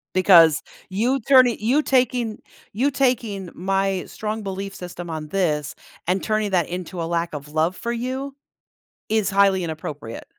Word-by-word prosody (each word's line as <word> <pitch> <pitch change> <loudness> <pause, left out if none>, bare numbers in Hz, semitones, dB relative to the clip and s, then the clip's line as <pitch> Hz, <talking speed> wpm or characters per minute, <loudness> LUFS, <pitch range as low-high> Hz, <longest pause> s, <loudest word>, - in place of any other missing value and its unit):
Because 170 -5 +6 0.3
you 235 +8 0
turning 255 -1 +5
you 250 +8 +2
taking 250 -5 +1 0.3
you 255 +8 +1
taking 235 -9 0
my 195 +1 0
strong 215 0 -4
belief 195 0 -5
system 175 -1 -8
on 155 -1 -5
this, 150 -5 -1 0.3
and 180 +2 0
turning 215 -1 0
that 180 -4 +1
into 180 0 -5
a - - -2
lack 170 0 -2
of 145 0 -7
love 160 +4 0
for 235 - -3
you 260 +3 -4 0.8
is 215 -3 +1
highly 195 -2 +3
inappropriate. 150 -7 -6
195 Hz, 150 wpm, -22 LUFS, 170-230 Hz, 0.8 s, Because